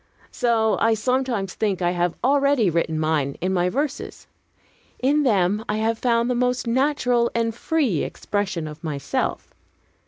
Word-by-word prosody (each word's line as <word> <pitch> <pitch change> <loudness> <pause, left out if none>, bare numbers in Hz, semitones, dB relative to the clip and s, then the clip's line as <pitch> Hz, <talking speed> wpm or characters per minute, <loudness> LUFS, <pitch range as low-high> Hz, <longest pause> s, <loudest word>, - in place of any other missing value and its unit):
So 225 -3 +1
I 225 0 +3
sometimes 240 -4 -1
think 205 -4 -1
I 175 -1 +1
have 175 -1 0
already 275 -6 +3
written 160 -1 0
mine, 155 -3 0
in 185 +2 -1
my 180 -1 +1
verses. 280 +6 -4 0.7
In 285 +4 +2
them, 205 -5 +2
I 210 - 0
have 225 +1 0
found 235 -1 +2
the 250 - +1
most 250 +1 0
natural 245 -1 +1
and 230 -1 0
free 245 - 0
expression 190 -6 -3
of 150 +2 -10
myself. 140 -3 -3
225 Hz, 150 wpm, -23 LUFS, 180-250 Hz, 0.7 s, I